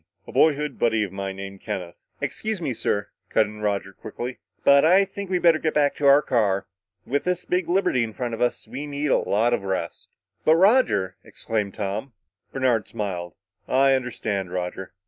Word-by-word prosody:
A - - -10
boyhood 150 -3 +2
buddy 115 -2 +2
of 100 - -4
mine 95 0 -4
named 95 0 -8
Kenneth 90 -2 -5 0.2
" - - -40
"Excuse 215 -2 -3
me, 145 -7 -2
sir," 105 -2 -1 0.2
cut 110 - +3
in 105 0 -10
Roger 100 -2 -1
quickly, 125 +6 -7 0.2
"but 140 0 +6
I 185 +5 +5
think 200 0 -7
we'd 180 -2 0
better 165 -2 +5
get 155 -1 -1
back 145 -1 +3
to 145 - +2
our 140 +2 +7
car. 100 -6 +1 0.4
With 145 +3 -1
this 180 0 -1
big 180 -2 -1
liberty 175 -9 +2
in 115 - -4
front 120 0 -4
of 115 - -5
us, 120 -2 0
we 135 +6 -6
need 145 0 -2
a - - +4
lot 115 +4 +1
of 120 - 0
rest." 95 -1 -4 0.3
"But, 160 - +5
Roger!" 185 - +3
exclaimed 105 -3 -3
Tom. 105 +5 -4 0.4
Bernard 125 -5 +1
smiled. 90 -6 -4 0.3
"I 135 +1 +4
understand, 110 -7 -2
Roger. 90 +1 -4
120 Hz, 190 wpm, -24 LUFS, 100-150 Hz, 0.4 s, our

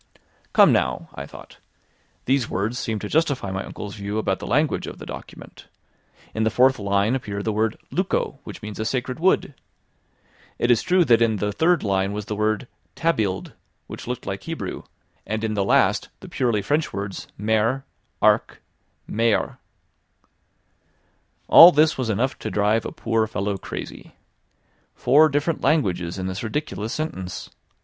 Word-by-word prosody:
"Come - - +7
now," - - 0
I 70 +1 -7
thought, - - -13 0.7
"these 130 -2 +1
words 110 +6 -2
seem 110 -1 -2
to 105 - -5
justify 145 -8 0
my 95 0 -3
uncle's 105 -1 -7
view 100 +1 -4
about 95 -3 0
the - - -7
language 150 +3 +1
of - - -7
the - - -9
document. - - -10 0.7
In 110 - -1
the 110 - +3
fourth 130 +3 +3
line 100 +2 +1
appeared 105 -6 -3
the 110 - +1
word 110 +1 0
"luco", - - -1
which - - -10
means 105 0 -7
a 110 - -1
sacred 130 +3 -2
wood. 180 -4 +2 1.0
It 120 - +2
is 120 - +4
true 180 -1 +3
that 115 -4 +4
in 115 -1 +3
the 105 +1 -1
third 165 - +2
line 100 -1 0
was 105 0 -4
the 105 - -4
word 110 +4 0 0.3
"tabiled", 110 - -1 0.3
which - - -9
looked - - -4
like - - -4
Hebrew, - - -5 0.5
and 110 +2 -2
in 110 -1 -1
the 100 -2 0
last 95 - +2
the - - -10
purely 115 -5 0
French 150 +2 0
words 100 0 -5
"mer", 110 +5 +1 0.4
"arc", - - +3 0.5
"mere."" 115 -1 0 1.9
All 170 +2 +10
this 155 0 +3
was 125 -3 -1
enough 120 +6 0
to - - -4
drive 105 +2 +1
a - - -6
poor 115 -1 0
fellow 100 -1 -2
crazy. 95 - -8 0.8
Four 150 +5 +5
different 145 +3 -1
languages 90 - +1
in 95 - -3
this 95 +1 -4
ridiculous 115 -3 -3
sentence! 110 - -5
110 Hz, 160 wpm, -23 LUFS, 100-135 Hz, 1.9 s, All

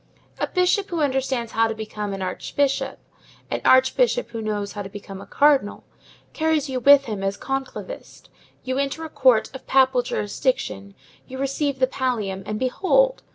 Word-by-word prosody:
A - - 0
bishop 365 +2 +1
who 340 -3 -2
understands 265 -5 -1
how 225 0 +2
to 225 - -4
become 210 -1 -5
an 195 -1 -4
archbishop, 275 +9 -1 0.5
an - - -2
archbishop 265 - +3
who 230 - -5
knows 205 -2 -3
how 205 - -6
to 195 - -7
become 195 -1 -9
a 200 - -12
cardinal, 280 -7 +2 0.5
carries 315 -2 +1
you 260 -1 -2
with 280 +1 +6
him 210 -4 -4
as 195 +1 -2
conclavist; 270 - -6 0.4
you 260 +1 -2
enter 280 +4 -2
a - - -7
court 250 -6 +3
of 265 - -10
papal 260 -1 +4
jurisdiction, 200 - -2 0.3
you 260 - -8
receive 275 +1 -1
the 260 - +3
pallium, 230 -8 -2
and 210 - -2
behold! 390 - +2
260 Hz, 165 wpm, -23 LUFS, 210-280 Hz, 0.5 s, with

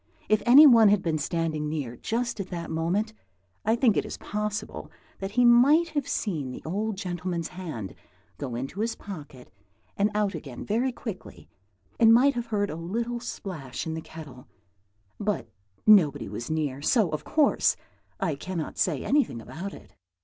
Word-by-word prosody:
If 215 0 +3
any 275 +6 +10
one 230 -6 +8
had 205 -2 +3
been 160 -2 0
standing 155 -1 -1
near 140 -6 -4
just 235 - -2
at 195 - -4
that 170 -2 -5
moment, 180 +7 -1 0.5
I 220 +2 +2
think 235 -3 +3
it - - +1
is - - -7
possible 210 0 -4 0.3
that 195 +1 -5
he 245 +1 +4
might 280 +8 +6
have 290 -4 -2
seen 155 - -2
the 125 - -8
old 205 +5 -2
gentleman's 175 -2 -3
hand 160 - -6 0.5
go 130 -5 -4
into 135 +10 -5
his 225 +1 -1
pocket 150 - -10 0.4
and 200 +1 +2
out 210 -1 +1
again 135 -5 -7
very 240 +5 +1
quickly, 220 -5 -8 0.5
and 225 -1 +7
might 260 +5 +6
have 240 -2 -4
heard 205 -2 -1
a - - -5
little 230 +9 -3
splash 165 - -6
in 160 - -3
the 160 - -4
kettle; 150 -6 -11 0.7
but 205 - -1 0.4
nobody 155 -10 +5
was 105 +4 -6
near, 150 -4 -2
so, 200 - +2
of 155 - -3
course, 305 -3 +3 0.4
I 160 - 0
cannot 165 +2 -5
say 155 -7 0
anything 275 - +1
about 175 - -7
it. - - -14
190 Hz, 170 wpm, -27 LUFS, 155-225 Hz, 0.7 s, any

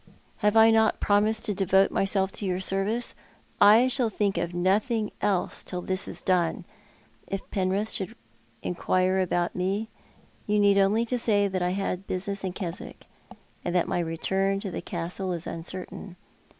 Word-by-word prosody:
Have 210 0 +2
I 225 0 +8
uot 220 0 +3
promised 215 +2 +2
to 210 - +1
devote 195 0 +3
myself 195 0 +1
to 205 - -4
your 180 0 -1
service 195 +5 -1 0.3
'? - - -30 0.2
I 250 +2 +4
shall 255 -2 +1
thiuk 200 -4 0
of 170 - -4
nothing 205 +5 +1
else 195 -3 0
till 180 -1 -5
this 185 0 0
is - - -7
done. 180 0 +1 0.6
If 195 0 -5
Penrith 195 +3 0
should 190 - -4 0.5
inquire 185 +1 +1
about 175 -1 0
me 195 +4 -1 0.6
you 210 0 +2
need 200 -1 +5
only 210 +4 +3
say 225 -4 +1
that 185 -1 -2
I 180 - +1
had 195 -1 -3
business 195 +2 -3
at 185 -1 -3
Keswick, 175 -3 -6 0.6
aud 175 - -2
that 180 -2 +2
my 180 - -1
return 190 +4 0
to 195 - -5
the - - -4
Castle 180 +2 -3
is 170 0 -5
uncertain. 180 +2 -6
195 Hz, 165 wpm, -26 LUFS, 180-205 Hz, 0.6 s, I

